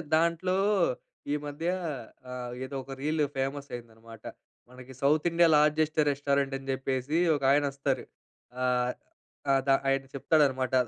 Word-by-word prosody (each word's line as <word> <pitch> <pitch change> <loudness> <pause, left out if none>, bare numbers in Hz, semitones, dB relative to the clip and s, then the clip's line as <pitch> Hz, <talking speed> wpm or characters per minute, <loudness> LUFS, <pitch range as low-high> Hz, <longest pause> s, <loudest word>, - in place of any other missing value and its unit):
దాంట్లో 170 +3 +1 0.8
ఈ - - +2
మధ్య 145 +3 -4 0.6
ఆహ్, 125 -1 -5
ఏదో 140 - -7
ఒక 135 - -11
రీల్ 155 +1 +1
ఫేమస్ 135 +1 -2
అయిందనమాట. 115 -2 -10 0.5
మనకి 125 +1 -12
సౌత్ 150 +3 +3
ఇండియా 170 0 +4
లార్జెస్ట్ 155 +1 +3
రెస్టారెంట్ 140 -1 0
అని 135 0 -10
చెప్పేసి 130 +3 -1 0.2
ఒకాయన 140 +1 +3
వస్తారు. 140 -1 -1 0.6
ఆహ్, 125 -1 +1 0.6
ఆహ్, 135 0 +4
ద - - +1 0.2
ఆయన 135 0 +1
చెప్తాడనమాట 135 -3 +2
140 Hz, 125 wpm, -29 LUFS, 130-150 Hz, 0.8 s, ఇండియా